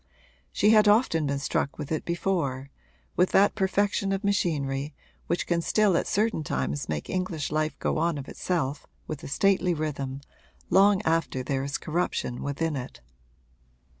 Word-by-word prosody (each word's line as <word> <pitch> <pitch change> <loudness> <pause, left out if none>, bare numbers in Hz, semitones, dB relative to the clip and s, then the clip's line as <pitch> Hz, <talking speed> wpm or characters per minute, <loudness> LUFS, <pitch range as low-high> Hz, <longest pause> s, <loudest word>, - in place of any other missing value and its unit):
She 210 - +3
had 215 -1 +6
often 205 - +3
been 140 0 0
struck 140 +1 -1
with 150 -1 -6
it 155 - -2
before 160 -7 -1 0.4
with 180 +1 +3
that 200 +1 +5
perfection 195 0 +1
of 195 +1 -1
machinery 145 -8 -1 0.3
which 170 - 0
can 170 -1 0
still 205 +1 +3
at - - +1
certain 215 -5 +1
times 70 - -2
make 75 -2 -3
English 185 -6 -2
life 155 0 -1
go - - -1
on 165 -1 +1
of 135 -1 -7
itself 150 -6 -2 0.2
with 155 -3 -6
a - - -6
stately 185 +3 +2
rhythm 140 -3 -3 0.5
long 195 +2 +5
after 160 -5 0
there 135 +1 -1
is 140 +1 -2
corruption 160 -6 -2
within 150 +2 -2
it. 130 -1 -6
160 Hz, 160 wpm, -27 LUFS, 140-190 Hz, 0.5 s, had